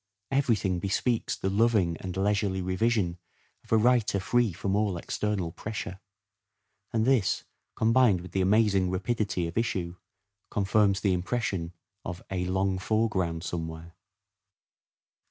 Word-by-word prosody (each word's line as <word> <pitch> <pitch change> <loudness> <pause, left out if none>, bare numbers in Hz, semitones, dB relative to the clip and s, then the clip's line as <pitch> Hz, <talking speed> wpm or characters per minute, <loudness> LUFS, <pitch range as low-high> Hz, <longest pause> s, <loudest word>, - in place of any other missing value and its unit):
Every 135 -4 +3
thing 95 -3 -1
bespeaks 110 +6 0
the 95 - -2
loving 100 -5 +3
and 95 -1 -6
leisurely 100 -1 +1
revision 95 -2 0 0.4
of - - -21
a 110 - +6
writer 115 -3 +3
free 120 +2 +2
from 95 +3 -2
all 105 -3 +1
external 95 -1 -2
pressure; 100 0 -6 0.9
and 110 -1 +1
this, 130 -7 +2 0.3
combined 115 -4 +4
with 90 -1 -10
the 95 - 0
amazing 100 -1 +3
rapidity 95 -1 -1
of 85 +6 -2
issue, 90 -6 -2 0.5
confirms 100 -1 +2
the 100 -2 +2
impression 90 -2 -2 0.3
of 85 0 -6
" - - -21
a 90 -1 -1
long 95 +1 0
foreground 95 -5 0
somewhere." 80 -1 -5
95 Hz, 135 wpm, -28 LUFS, 90-110 Hz, 0.9 s, a